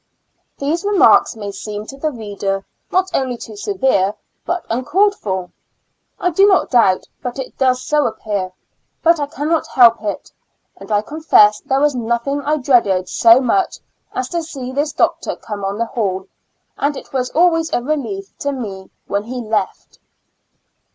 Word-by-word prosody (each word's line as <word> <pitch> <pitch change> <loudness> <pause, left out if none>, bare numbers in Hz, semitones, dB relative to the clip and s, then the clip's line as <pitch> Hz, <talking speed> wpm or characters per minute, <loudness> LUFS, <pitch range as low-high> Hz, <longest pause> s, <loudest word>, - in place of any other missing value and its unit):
These 310 +6 -1
remarks 405 - +4
may 205 -2 -5
seem 210 +1 -6
to 270 - -9
the 310 +3 -1
reader 200 -5 -4 0.3
not 375 +1 +1
only 255 -2 -1
too 220 -2 -9
severe 210 - +1 0.3
but 350 0 -2
uncalled 370 - +2
for. 190 - -4 0.7
I 360 - +1
do 390 +5 +5
not 385 -2 +3
doubt 225 -7 +4 0.2
but 245 0 -5
it 265 - -6
does 255 -1 +2
so 300 -1 +2
appear, 200 -3 -3 0.5
but 335 -1 +4
I 290 - -1
cannot 310 +3 -1
help 235 -3 +5
it; 205 -2 -4 0.5
and - - -11
I 205 0 +2
confess 215 -7 +4
there 270 0 0
was 295 0 +3
nothing 240 +4 -1
I 300 +2 0
dreaded 220 -9 +2
so 230 +1 +6
much 370 +9 +1 0.3
as 255 - -3
to 340 - -1
see 270 -6 -6
this 290 +3 -1
doctor - - 0
come 205 -2 -7
on 195 +1 -2
the 230 - 0
hall, 190 -5 -2 0.5
and 285 0 0
it - - -11
was 255 -1 -1
always 330 -1 +3
a 240 - 0
relief 230 -10 -3
to 285 - -1
me 200 -8 -6 0.2
when 200 +1 -2
he 250 +2 -5
left. 215 -4 -3
250 Hz, 165 wpm, -18 LUFS, 210-295 Hz, 0.7 s, so